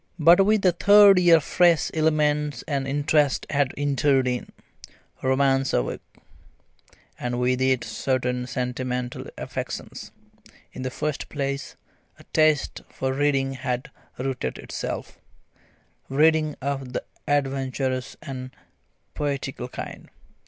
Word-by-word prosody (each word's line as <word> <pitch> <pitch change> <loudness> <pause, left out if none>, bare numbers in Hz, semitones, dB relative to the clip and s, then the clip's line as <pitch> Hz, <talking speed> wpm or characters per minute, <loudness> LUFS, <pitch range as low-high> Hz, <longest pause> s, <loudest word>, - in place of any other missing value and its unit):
But 170 +3 +6
with 210 +1 +2
the 185 - +5
third 200 +2 +7
year 170 -2 +6
fresh 170 +2 +3
elements 150 -3 +1
and 140 -3 -1
interests 145 0 +1
had 140 -2 +1
entered 140 -2 +2
in. 125 -1 -3 0.7
Romance 135 0 +2
awoke, - - -1 1.2
and 120 0 -2
with 125 +1 +1
it 130 -1 +2
certain 125 +2 -2
sentimental 125 -1 -3
affections. - - -6 0.6
In - - -7
the 130 - -2
first 150 +3 -4
place, 140 -1 -3 0.4
a - - -16
taste 155 -2 +2
for 130 0 -2
reading 135 -1 +1
had 125 -1 -4 0.3
rooted 130 0 -3
itself - - -6 0.9
reading 155 +1 +3
of 135 -2 -3
the - - -2 0.2
adventurous 135 -2 -1
and 130 -4 -6 0.6
poetical 140 -3 -3
kind. - - -8
135 Hz, 110 wpm, -24 LUFS, 130-150 Hz, 1.2 s, third